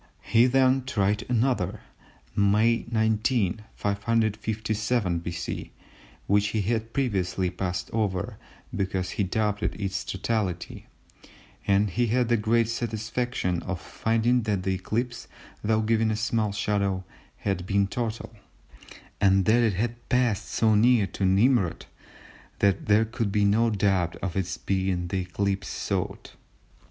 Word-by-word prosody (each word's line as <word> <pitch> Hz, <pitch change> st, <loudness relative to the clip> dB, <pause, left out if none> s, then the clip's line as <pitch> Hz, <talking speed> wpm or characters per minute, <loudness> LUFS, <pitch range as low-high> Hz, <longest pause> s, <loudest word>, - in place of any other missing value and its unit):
He 115 Hz, +2 st, +4 dB
then 130 Hz, 0 st, +3 dB
tried 105 Hz, -3 st, 0 dB
another 110 Hz, -5 st, 0 dB, 0.5 s
(May 105 Hz, +3 st, +3 dB
19, 110 Hz, -2 st, +1 dB
557 110 Hz, -1 st, 0 dB
B.C.) 85 Hz, 0 st, -5 dB, 0.5 s
which 100 Hz, +1 st, +3 dB
he 110 Hz, 0 st, -1 dB
had 115 Hz, +2 st, -1 dB
previously 95 Hz, -8 st, 0 dB
passed 90 Hz, -1 st, -3 dB
over 100 Hz, -5 st, -1 dB, 0.4 s
because 95 Hz, -1 st, -1 dB
he 100 Hz, -, -1 dB
doubted 105 Hz, +1 st, -1 dB
its 95 Hz, -2 st, -2 dB
totality, 95 Hz, -3 st, -3 dB, 0.8 s
and 100 Hz, 0 st, +3 dB
he 120 Hz, +5 st, +1 dB
had 120 Hz, +1 st, +1 dB
the 120 Hz, -, +4 dB
great 115 Hz, +2 st, +2 dB
satisfaction 115 Hz, -4 st, -2 dB
of 95 Hz, -3 st, -4 dB
finding 115 Hz, +5 st, +1 dB
that 105 Hz, -4 st, -1 dB
the 95 Hz, 0 st, 0 dB
eclipse, 115 Hz, +6 st, -3 dB, 0.4 s
though 110 Hz, +1 st, +2 dB
giving 110 Hz, 0 st, +2 dB
a 110 Hz, -, 0 dB
small 110 Hz, 0 st, 0 dB
shadow, 100 Hz, -2 st, 0 dB, 0.3 s
had 95 Hz, -3 st, -2 dB
been 100 Hz, 0 st, +2 dB
total, 115 Hz, +1 st, -4 dB, 0.9 s
and 95 Hz, -1 st, +4 dB
that 115 Hz, +4 st, +4 dB
it 115 Hz, -3 st, +2 dB
had 120 Hz, +4 st, -3 dB
passed 120 Hz, -5 st, +1 dB
so 110 Hz, -1 st, +2 dB
near 115 Hz, 0 st, +4 dB
to 95 Hz, -, -3 dB
Nimrud 100 Hz, -1 st, +2 dB, 0.7 s
that 100 Hz, -2 st, +1 dB
there 105 Hz, +2 st, +4 dB
could 115 Hz, -2 st, -2 dB
be 105 Hz, 0 st, +2 dB
no 110 Hz, +3 st, +3 dB
doubt 95 Hz, -5 st, +1 dB
of 90 Hz, -3 st, -4 dB
its 95 Hz, -2 st, -2 dB
being 95 Hz, -2 st, -1 dB
the 95 Hz, -, -1 dB
eclipse 95 Hz, +1 st, -2 dB
sought. -, -, -3 dB
105 Hz, 130 wpm, -26 LUFS, 95-115 Hz, 0.9 s, He